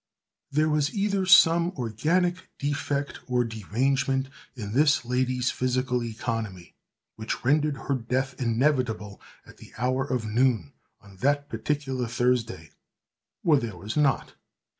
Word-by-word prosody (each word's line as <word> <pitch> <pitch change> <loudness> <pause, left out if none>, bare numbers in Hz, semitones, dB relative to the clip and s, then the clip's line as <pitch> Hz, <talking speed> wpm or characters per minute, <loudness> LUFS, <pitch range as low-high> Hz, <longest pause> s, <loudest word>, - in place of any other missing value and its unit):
There 155 +2 +2
was 150 -1 0
either 200 -2 0
some 170 0 +6
organic 165 - 0
defect 140 0 -2
or 125 -1 +2
derangement 130 +5 -1 0.3
in 105 -4 -6
this 145 -1 +3
lady's 125 0 0
physical 125 -1 0
economy, 110 -5 -4 0.4
which 110 +2 -4
rendered 150 +1 +2
her 140 - 0
death 130 +1 -1
inevitable 115 -4 0 0.2
at - - -16
the - - -14
hour 130 +3 0
of 125 -4 -2
noon, 110 - +1 0.3
on 100 -1 -17
that 145 +5 +1
particular 135 -6 -2
Thursday, 120 -8 -1 0.7
or 155 -3 +5
there 110 -7 -5
was 105 +5 -6
not. 145 -2 +1
130 Hz, 125 wpm, -26 LUFS, 115-145 Hz, 0.7 s, some